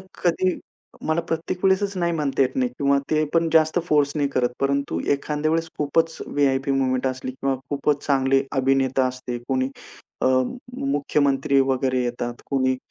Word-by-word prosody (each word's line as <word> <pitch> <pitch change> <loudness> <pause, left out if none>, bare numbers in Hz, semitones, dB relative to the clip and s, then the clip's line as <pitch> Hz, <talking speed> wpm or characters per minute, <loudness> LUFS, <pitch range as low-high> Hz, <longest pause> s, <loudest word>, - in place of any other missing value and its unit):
तर - - -14 0.2
कधी 180 +1 +2 0.5
मला 155 +2 +1
प्रत्येक 165 +3 -3
वेळेसच 195 +1 +2
नाही 170 -1 +1
म्हणता 145 -4 +1
येत 130 0 -1
नाही 125 -1 +1
किंवा 140 0 +3
ते 155 0 +3
पण 165 0 +3
जास्त 160 +1 +4
फोर्स 145 -2 +2
नाही 145 -2 +1
करत. 125 -3 +1
परंतु 140 - 0
एखाद्या 150 +2 -1
वेळेस 165 0 0
खूपच 160 +3 +1
व्ही-आय-पी 140 -1 +1
मूव्हमेंट 130 -1 +1
असली 130 0 -4
किंवा 135 +1 -1 0.2
खूपच 145 0 0
चांगले 135 -1 +3
अभिनेता 135 0 +2
असते. 125 -1 -5
कोणी 130 0 +1 0.5
अ, - - +3 0.5
मुख्यमंत्री 140 -1 +1
वगैरे 130 -1 0
येतात 120 0 -4
कोणी. 130 -2 +2
140 Hz, 160 wpm, -23 LUFS, 130-155 Hz, 0.5 s, जास्त